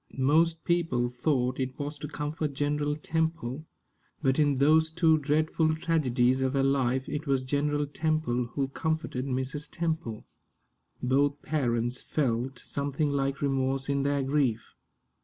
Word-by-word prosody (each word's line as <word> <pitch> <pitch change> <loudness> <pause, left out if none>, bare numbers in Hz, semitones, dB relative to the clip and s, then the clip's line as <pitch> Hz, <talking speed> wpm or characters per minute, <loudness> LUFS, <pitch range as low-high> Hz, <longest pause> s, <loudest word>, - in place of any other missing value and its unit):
Most 160 +4 +3
people 165 -9 +1
thought 125 0 0
it 130 0 -3
was 145 0 -5
to 150 - -5
comfort 150 0 -3
General 145 +1 0
Temple, 160 -2 -2 0.5
but 135 -1 +1
in 145 -2 +3
those 155 +4 +4
two 160 -1 +3
dreadful 155 +2 +1
tragedies 130 -6 +1
of 130 0 +1
her 135 -1 +2
life 130 -1 +1
it 150 +1 -4
was 135 -2 +1
General 145 +2 0
Temple 155 -5 0
who 135 -2 0
comforted 160 -3 -2
Mrs. 130 +3 -3
Temple. 160 -10 -3 0.8
Both 140 +3 +1
parents 120 -4 0
felt 130 -2 -1
something 140 +1 -2
like 140 0 -1
remorse 135 0 0
in 140 0 +1
their 140 0 +1
grief. 135 -5 0
140 Hz, 140 wpm, -28 LUFS, 130-155 Hz, 0.8 s, those